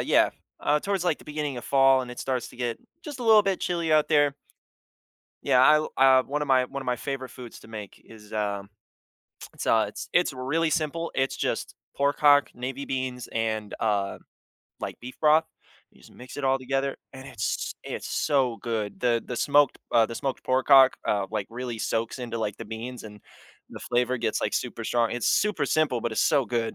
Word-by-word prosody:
yeah, -, -, +3 dB, 0.3 s
uh, 150 Hz, 0 st, +1 dB
towards, 195 Hz, -3 st, -1 dB
like, 170 Hz, -4 st, +1 dB
the -, -, -16 dB
beginning 150 Hz, -3 st, -4 dB
of 120 Hz, -, -7 dB
fall, 135 Hz, -1 st, +4 dB
and 125 Hz, -, -8 dB
it 125 Hz, -, -9 dB
starts 130 Hz, -3 st, -2 dB
to -, -, -15 dB
get 120 Hz, -2 st, -3 dB, 0.2 s
just 290 Hz, -5 st, -8 dB
a -, -, -3 dB
little 220 Hz, -2 st, +6 dB
bit 195 Hz, -2 st, -1 dB
chilly 170 Hz, -3 st, -1 dB
out 155 Hz, -1 st, +4 dB
there. 145 Hz, -2 st, +3 dB, 1.1 s
Yeah, 130 Hz, +2 st, +6 dB
l 155 Hz, 0 st, +1 dB
uh, 130 Hz, -1 st, +6 dB
one 145 Hz, +3 st, -3 dB
of 150 Hz, -, -2 dB
my 130 Hz, -1 st, +4 dB
one 140 Hz, +1 st, -6 dB
of -, -, -12 dB
my 125 Hz, -, +1 dB
favorite 130 Hz, +1 st, -5 dB
foods 125 Hz, -3 st, -10 dB
to -, -, -15 dB
make 105 Hz, -3 st, -9 dB
is, 105 Hz, -2 st, -15 dB
um, 100 Hz, -2 st, -2 dB, 0.8 s
it's -, -, -7 dB
uh, 110 Hz, -2 st, +4 dB
it's -, -, -8 dB
it's 175 Hz, -4 st, +3 dB
really 145 Hz, +6 st, -1 dB
simple. 165 Hz, +1 st, -1 dB
It's 135 Hz, 0 st, 0 dB
just -, -, -2 dB, 0.2 s
pork 140 Hz, +1 st, +1 dB
hock, 145 Hz, -1 st, +5 dB
navy 130 Hz, +3 st, -5 dB
beans, 130 Hz, -2 st, -3 dB
and, 110 Hz, -2 st, -2 dB
uh, 100 Hz, -3 st, 0 dB, 0.6 s
like, -, -, -5 dB
beef 125 Hz, +2 st, -10 dB
broth. 155 Hz, +1 st, +5 dB, 0.5 s
You -, -, -23 dB
just -, -, -17 dB
mix 125 Hz, +3 st, -11 dB
it 145 Hz, -, -4 dB
all 135 Hz, 0 st, +3 dB
together 135 Hz, +1 st, -2 dB, 0.2 s
and 130 Hz, +1 st, -10 dB
it's 105 Hz, -6 st, -3 dB
it's -, -, -5 dB
so 130 Hz, -5 st, +1 dB
good. 105 Hz, -4 st, -4 dB
The 120 Hz, -2 st, +1 dB
the 125 Hz, -, -5 dB
smoked 145 Hz, -1 st, +3 dB
uh, 115 Hz, -2 st, +5 dB
the 115 Hz, -, -7 dB
smoked 135 Hz, -2 st, -3 dB
pork 130 Hz, 0 st, +1 dB
hock, 135 Hz, -2 st, +7 dB
uh, 100 Hz, -2 st, +1 dB
like, 105 Hz, -3 st, -2 dB
really 120 Hz, -1 st, -5 dB
soaks 115 Hz, +3 st, -2 dB
into, 120 Hz, -2 st, -5 dB
like, 105 Hz, -2 st, -2 dB
the -, -, -8 dB
beans, 115 Hz, +3 st, -7 dB
and 105 Hz, -1 st, -11 dB, 0.5 s
the -, -, -8 dB
flavor 125 Hz, +1 st, 0 dB
gets, 115 Hz, -2 st, -1 dB
like, -, -, -1 dB
super -, -, -3 dB
strong. 120 Hz, -1 st, +1 dB
It's 120 Hz, -1 st, 0 dB
super 205 Hz, -8 st, +2 dB
simple, 155 Hz, -6 st, +1 dB
but 120 Hz, 0 st, -2 dB
it's -, -, 0 dB
so 140 Hz, -3 st, +3 dB
good. 115 Hz, 0 st, -2 dB
130 Hz, 210 wpm, -26 LUFS, 115-145 Hz, 1.1 s, hock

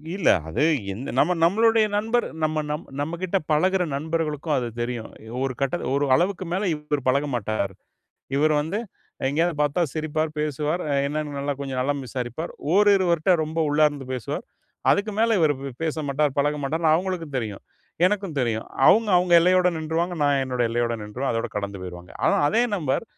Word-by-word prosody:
இல்ல. 195 Hz, -, +2 dB, 0.2 s
அது 80 Hz, -, 0 dB, 0.3 s
எந்த 120 Hz, +8 st, -6 dB
நம்ம 175 Hz, +6 st, +4 dB
நம்மளுடைய 220 Hz, +5 st, +4 dB
நண்பர் 225 Hz, +3 st, +1 dB, 0.2 s
நம்ம 155 Hz, 0 st, +1 dB, 0.4 s
நம்மக்கிட்ட 170 Hz, +5 st, -1 dB
பழகுற 185 Hz, +5 st, +3 dB
நண்பர்களுக்கும் 155 Hz, 0 st, -1 dB
அது 125 Hz, -2 st, -1 dB
தெரியும். 120 Hz, -2 st, -4 dB, 0.3 s
ஒரு 135 Hz, -1 st, -1 dB
கட்டத்தில 135 Hz, -2 st, -1 dB
ஒரு 145 Hz, -, +1 dB
அளவுக்கு 185 Hz, +3 st, 0 dB
மேல 195 Hz, +2 st, 0 dB
இவரு 150 Hz, -1 st, -2 dB
பழக 140 Hz, +3 st, +3 dB
மாட்டார். 105 Hz, -3 st, -2 dB, 0.6 s
இவரு 155 Hz, +2 st, +3 dB
வந்து 170 Hz, +7 st, -3 dB, 0.5 s
எங்கேயாவது 160 Hz, +4 st, +1 dB
பார்த்தா 145 Hz, +3 st, +1 dB
சிரிப்பார், 155 Hz, 0 st, -1 dB
பேசுவார், 150 Hz, +3 st, -1 dB
அ -, -, +1 dB
என்னன்னு 150 Hz, 0 st, -3 dB
நல்லா 140 Hz, +1 st, -1 dB
கொஞ்சம் 135 Hz, -2 st, -3 dB
நலம் 140 Hz, +2 st, -1 dB
விசாரிப்பார். 125 Hz, +6 st, -5 dB, 0.2 s
ஓரிருவர்ட்ட 190 Hz, -4 st, +4 dB
ரொம்ப 155 Hz, +1 st, -4 dB
உள்ளார்ந்து 145 Hz, -2 st, +2 dB
பேசுவார். 125 Hz, -3 st, -4 dB, 0.5 s
அதுக்கு 205 Hz, +1 st, +1 dB
மேல 230 Hz, +1 st, +3 dB
இவரு 155 Hz, -2 st, +3 dB, 0.3 s
பேசமாட்டார். 150 Hz, -2 st, 0 dB
பழக 145 Hz, +1 st, +2 dB
மாட்டார்ன்னு 160 Hz, +3 st, +1 dB
அவுங்களுக்கும் 170 Hz, -4 st, -2 dB
தெரியும். 110 Hz, -5 st, -5 dB, 0.4 s
எனக்கும் 195 Hz, -5 st, -2 dB
தெரியும். 115 Hz, -3 st, -1 dB, 0.2 s
அவுங்க, 220 Hz, 0 st, +5 dB
அவுங்க 180 Hz, 0 st, +2 dB
எல்லையோட 180 Hz, +1 st, +4 dB
நின்றுவாங்க. 165 Hz, +3 st, -1 dB
நான் 140 Hz, -1 st, +3 dB
என்னோட 125 Hz, -2 st, -1 dB
எல்லையோட 120 Hz, 0 st, 0 dB
நின்றுவேன். 120 Hz, +6 st, -3 dB
அதோட 115 Hz, 0 st, -2 dB
கடந்து 100 Hz, -1 st, -4 dB
போயிருவாங்க. 90 Hz, -1 st, -9 dB
ஆனா, -, -, +4 dB
அதே 230 Hz, +7 st, +3 dB
நபர் 150 Hz, -1 st, -1 dB
150 Hz, 155 wpm, -24 LUFS, 135-175 Hz, 0.6 s, அவுங்க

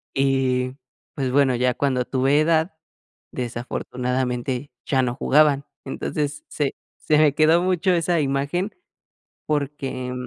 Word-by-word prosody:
Y, 130 Hz, -1 st, +1 dB, 0.4 s
pues, 130 Hz, -3 st, -1 dB
bueno, 135 Hz, -2 st, +3 dB
ya 125 Hz, +1 st, +2 dB
cuando 130 Hz, -3 st, 0 dB
tuve 135 Hz, +3 st, +2 dB
edad, 160 Hz, +1 st, +1 dB, 0.6 s
desafortunadamente, 125 Hz, +2 st, -3 dB
ya 135 Hz, -2 st, +2 dB
no 120 Hz, -, 0 dB
jugaban. 145 Hz, 0 st, +3 dB, 0.2 s
Entonces 145 Hz, +2 st, -3 dB
se 145 Hz, -3 st, -2 dB, 0.2 s
se 150 Hz, -, +2 dB
me 150 Hz, -2 st, +4 dB
quedó 160 Hz, +2 st, +5 dB
mucho 185 Hz, 0 st, +1 dB
esa 170 Hz, -1 st, +2 dB
imagen, 145 Hz, +8 st, -1 dB, 0.7 s
porque, 140 Hz, -4 st, -2 dB
140 Hz, 115 wpm, -23 LUFS, 130-155 Hz, 0.7 s, quedó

